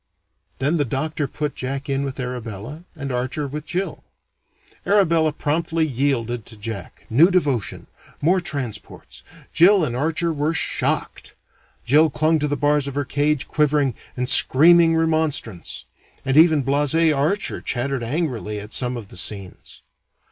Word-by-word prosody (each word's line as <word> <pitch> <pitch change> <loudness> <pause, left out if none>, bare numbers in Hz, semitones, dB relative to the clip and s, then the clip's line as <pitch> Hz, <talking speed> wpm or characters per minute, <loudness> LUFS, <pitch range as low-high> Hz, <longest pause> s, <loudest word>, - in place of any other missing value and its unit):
Then 145 +6 +1
the 145 - +2
doctor 145 +3 -3
put 150 +2 -4
Jack 135 +2 -5
in 140 0 -1
with 135 -1 -5
Arabella, 125 - -6
and 140 -4 -5
Archer 130 +4 -2
with 150 +3 -7
Jill. 185 +3 -3 0.8
Arabella 165 -6 +3
promptly 160 +2 -1
yielded 120 -5 -2
to 110 - -8
Jack. 110 +2 -7
New 150 +10 +5
devotion. 140 - -1 0.3
More 180 +5 +2
transports. 140 - -6 0.3
Jill 180 +2 +5
and 120 -4 -4
Archer 160 +5 0
were 150 +2 -1
shocked. - - -1 0.5
Jill 155 +5 +4
clung 155 +2 +1
to 150 - 0
the 145 0 -2
bars 145 +1 +1
of 140 - -6
her 145 -1 -1
cage, 145 +1 0
quivering, 145 -3 +1 0.2
and 125 0 -1
screaming 165 +5 +6
remonstrance; 155 - -1 0.4
and 135 0 0
even 155 -2 +5
blase 145 +2 +1
Archer 165 +4 +1
chattered 130 +1 -2
angrily 120 -5 -3
at 105 +1 -9
some 125 -1 0
of 105 -4 -9
the - - -10
scenes. 95 0 -4
145 Hz, 145 wpm, -21 LUFS, 125-160 Hz, 0.8 s, screaming